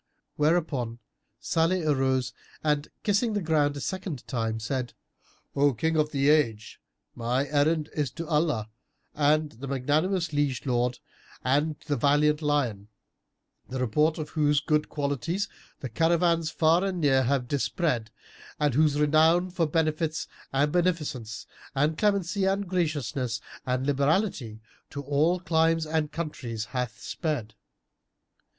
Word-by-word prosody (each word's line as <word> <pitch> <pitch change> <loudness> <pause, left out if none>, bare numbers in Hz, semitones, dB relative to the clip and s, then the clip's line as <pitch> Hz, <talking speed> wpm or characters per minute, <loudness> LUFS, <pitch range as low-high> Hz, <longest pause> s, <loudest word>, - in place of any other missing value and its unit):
Whereupon 150 -7 0 0.4
Salih 165 +2 +1
arose 130 -3 +1 0.3
and, 150 -1 +1 0.2
kissing 215 +2 +1
the 205 - +1
ground 150 -3 +2
a - - -4
second 180 - -4
time, 115 -3 -2
said, 125 +2 -3 0.6
"O 140 -2 +3
King 160 +7 0
of 155 -1 +2
the 140 -1 +1
Age, 115 -9 +1 0.3
my 125 +3 0
errand 150 +2 +1
is 150 -3 0
to 165 +1 -5
Allah 150 -9 0 0.5
and 150 +1 +2
the 130 +5 -9
magnanimous 155 +6 0
liege 145 -4 0
lord 125 -1 0 0.5
and 145 +4 +1
the 145 -3 0
valiant 150 +4 +3
lion, 130 -9 0 0.8
the 130 - -4
report 150 +6 +2
of 155 -2 -5
whose 150 -2 +2
good 150 +1 0
qualities 150 +7 -2 0.3
the 130 - -4
caravans 165 +4 +2
far 165 +2 +3
and 190 -2 -1
near 135 -4 +4
have 130 -1 0
dispread 140 -3 -1 0.5
and 150 -3 +2
whose 150 +1 +3
renown 160 +4 +4
for 170 -3 +1
benefits 155 0 0 0.2
and 145 +2 +2
beneficence 150 - -1 0.3
and 150 +3 +2
clemency 200 0 +1
and 195 +1 0
graciousness 145 -9 -1 0.3
and 130 +1 0
liberality 140 - 0 0.3
to 140 - -6
all 150 +6 +2
climes 165 -2 +2
and 155 -1 -1
countries 125 -9 -4
hath 125 -4 -3
sped." 145 -10 -3
150 Hz, 130 wpm, -27 LUFS, 130-165 Hz, 0.8 s, near